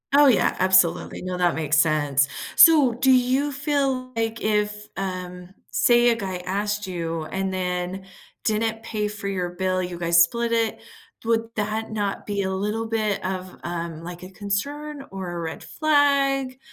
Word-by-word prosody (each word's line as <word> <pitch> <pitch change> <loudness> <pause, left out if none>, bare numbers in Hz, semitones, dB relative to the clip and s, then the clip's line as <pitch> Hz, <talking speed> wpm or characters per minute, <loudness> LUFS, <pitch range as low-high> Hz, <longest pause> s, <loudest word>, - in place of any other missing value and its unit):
Oh, 290 0 +7
yeah, 245 -7 +3
absolutely, 185 -2 +3
no, 185 0 -3
that 175 -2 +2
makes 155 -1 0
sense. 145 -3 +3 0.3
So, 300 -7 +7
do 260 +3 +3
you 260 +3 +2
feel, 275 -3 -1
like, 225 0 -2
if, 210 0 -1
um, 180 -2 -5 0.2
say, 240 0 +4
a 235 - +3
guy 190 -4 -4
asked 205 +2 -2
you 165 -3 -3
and 190 +3 -3
then 180 +1 -3 0.4
didn't 225 +1 -1
pay 210 -2 -2
for 205 -1 -6
your 180 -3 -2
bill, 185 +1 -1
you 180 -1 -5
guys 170 0 +4
split 235 +6 -1
it, 230 -1 0 0.5
would 225 0 +1
that 215 +1 -2
not 205 -2 -3
be 200 -1 -2
a 190 - -2
little 210 +4 -2
bit 215 -2 -1
of, 185 -1 -4
um, 170 -2 -5
like, 175 0 -8
a 185 - -9
concern 275 +10 -4
or 190 -2 -6
a 175 - -5
red 165 -1 -5
flag? 275 -3 +1
205 Hz, 165 wpm, -24 LUFS, 180-235 Hz, 0.5 s, Oh